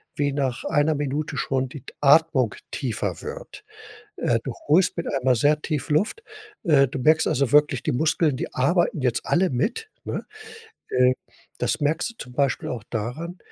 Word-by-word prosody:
wie 145 -1 0
nach 135 -3 -2
einer 150 +1 +2
Minute 145 +1 -2
schon 130 -1 -1
die 140 -2 -9
t - - -12
Atmung 145 -5 +4 0.2
tiefer 105 - -3
wird. - - -8 0.5
Äh, 115 -1 +1
du 130 - -4
holst 175 +5 +4
mit 170 - -3
einmal 130 -2 +2
sehr 150 +5 +2
tief 155 0 -3
Luft. 205 - 0 0.4
Äh, 140 -6 +5
du 135 +1 -5
merkst 155 +4 +4
also 135 -2 +1
wirklich, 145 -4 +4
die - - 0
Muskeln, 155 0 +1
die - - -5
arbeiten 170 - +1
jetzt 125 -2 0
alle 185 +1 +2
mit, 245 - -2
ne? - - -4 0.6
Äh, 125 0 +4 0.5
das - - 0
merkst 155 +9 +1
du - - -23
zum 125 - -9
Beispiel 140 0 0
auch 115 -4 -5
daran, 125 - -4
145 Hz, 175 wpm, -24 LUFS, 125-160 Hz, 0.6 s, Äh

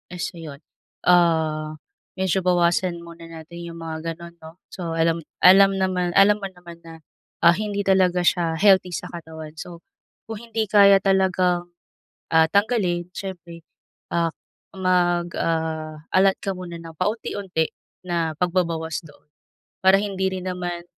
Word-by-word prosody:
So 170 -1 -5
yun, 150 -2 -10 0.4
ah, 160 -3 +2 0.4
medyo 190 0 0
bawasan 175 -1 +1
muna 170 0 -12
natin 165 +1 -11
yung 170 0 -9
mga 165 0 -5
ganun 170 0 -13
'no. 160 0 -11 0.2
So, 170 -3 -5
alam 165 0 +1 0.2
alam 195 +1 +7
naman 185 -2 -1
alam 205 +1 +5
mo 195 - -4
naman 175 -2 -14
na, 165 -1 -14 0.4
ah, 170 - +8
hindi 205 +2 -2
talaga 185 -2 +2
siya 170 -2 +1
healthy 185 -1 +3
sa - - -6
katawan. 160 -2 -9
So 170 -1 -9 0.4
kung 220 -2 -7
hindi 225 -1 -1
kaya 200 -2 +6
talagang, 185 -2 +1 0.6
ah, 160 -1 +5
tanggalin, 195 -5 +1
siyempre, 170 -3 -8 0.5
ah, 170 -1 +1 0.4
mag, 175 -2 +1
ah, 160 -2 -2
allot 190 +1 +4
ka 195 - -1
muna 180 -2 -7
ng 165 -1 -11
paunti-unti 190 -4 -2 0.4
na 170 -2 -1
pagbabawas 170 -2 -1
doon. 145 - -20 0.6
Para 190 +1 +6
hindi 195 -2 -2
rin 185 0 -5
naman, 175 -1 -4
175 Hz, 140 wpm, -23 LUFS, 165-190 Hz, 0.6 s, ah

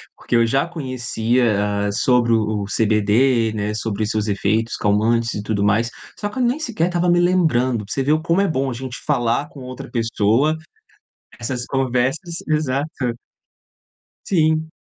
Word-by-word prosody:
porque 120 - -3
eu 115 0 +5
já 135 +7 +1
conhecia, 125 -6 -1 0.4
hã, - - -1
sobre 120 +2 +2
o 110 -2 +1
o - - -3
CBD, 110 +2 +2
né, 105 0 -2
sobre 110 -1 -2
os 110 - -2
seus 110 -1 -1
efeitos 110 +3 0
calmantes 115 +3 +1
e 105 - -3
tudo 105 -1 -1
mais, 105 +3 +2 0.3
só 205 - -2
que 210 - -10
eu 255 - +1
nem 245 +5 +1
sequer 215 - -1
tava 175 0 +1
me 175 0 +4
lembrando, 130 -11 +2
pra - - -12
você 135 - 0
ver 145 - +1
o 155 +1 +2
como 170 +2 +1
é 200 - +2
bom 135 -4 -1
a - - -3
gente 125 +1 -6
falar 135 0 +1
com 140 - -12
outra 125 0 -8
pessoa 115 +5 +1 0.8
essas 125 +1 -3
conversas, 135 +6 -1
exato. 150 -1 0 1.4
Sim. 160 -3 +1
125 Hz, 175 wpm, -20 LUFS, 110-155 Hz, 1.4 s, eu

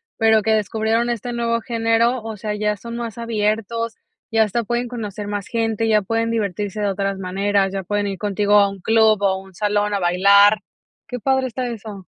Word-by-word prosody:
pero 220 -1 +4
que 220 - 0
descubrieron 220 +2 +1
este 240 +1 -3
nuevo 230 -1 0
género, 230 +1 +1
o 220 -2 -6
sea, 210 +1 -3
ya 210 0 -1
son 235 +3 -8
más 235 -1 -5
abiertos, 225 0 -2 0.3
y 225 - -2
hasta 220 +2 +2
pueden 240 +2 -2
conocer 210 -4 -6
más 205 -1 -4
gente, 225 -1 0
ya 215 -1 +4
pueden 225 +3 -1
divertirse 210 -1 -2
de 205 - 0
otras 195 0 -1
maneras, 195 +1 0
ya 195 - -3
pueden 205 +2 -1
ir 195 -1 -4
contigo 205 0 +2
a 200 -1 +5
un 195 0 -9
club, 220 +1 +3
o 195 -1 +2
un 190 0 -15
salón 205 +2 0
a 200 - 0
bailar. 200 +4 +5 0.5
Qué 250 - -4
padre 265 +1 +1
está 250 +1 -4
eso. 215 -4 -8
215 Hz, 195 wpm, -21 LUFS, 200-230 Hz, 0.5 s, a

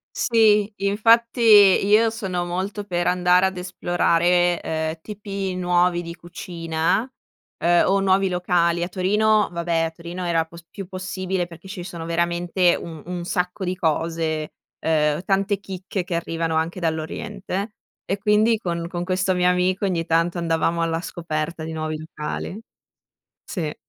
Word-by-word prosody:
Sì, 215 -3 +3
infatti 230 +4 +3
io 210 0 +6
sono 190 -6 -3
molto 190 +4 -3
per 175 -3 -2
andare 180 +1 +4
ad 190 - -3
esplorare, 175 -1 +1
uhm, 160 0 -3
tipi 200 -1 -5
nuovi 175 -1 +2
di 170 0 -7
cucina, 170 +5 -2 0.5
uhm, 175 0 +5
o 195 +1 +3
nuovi 195 0 +3
locali. 175 -1 +1
A 175 - -2
Torino, 210 +3 +2
vabbè 170 -1 -2
a 165 - -2
Torino 170 +2 -7
era 165 -1 +1
p 160 - -21 0.2
più 195 -3 -7
possibile, 185 -1 -3
perché 170 +1 -14
ci 190 -1 -6
sono 170 -2 -7
veramente 170 +1 +1
un 160 -3 -8
un 175 -1 -4
sacco 180 +2 -2
di 180 0 -1
cose, 160 -2 -1 0.3
uhm, 150 0 +1
tante 195 +1 +1
chicche 190 -1 -5
che 175 - -4
arrivano 165 -1 -2
anche 165 +3 -1
dall'oriente. 195 +5 -4 0.3
E 195 - -2
quindi, 210 +2 +3
con 170 -4 -3
con 175 0 -4
questo 185 +1 0
mio 180 0 +2
amico 185 +2 +1
ogni 170 -3 -1
tanto 165 +2 +1
andavamo 165 0 0
alla 165 0 0
scoperta 165 -1 -4
di 160 - -5
nuovi 155 0 -3
locali. 160 +6 -6 0.8
Sì. 160 -6 -4
180 Hz, 150 wpm, -23 LUFS, 170-195 Hz, 0.8 s, io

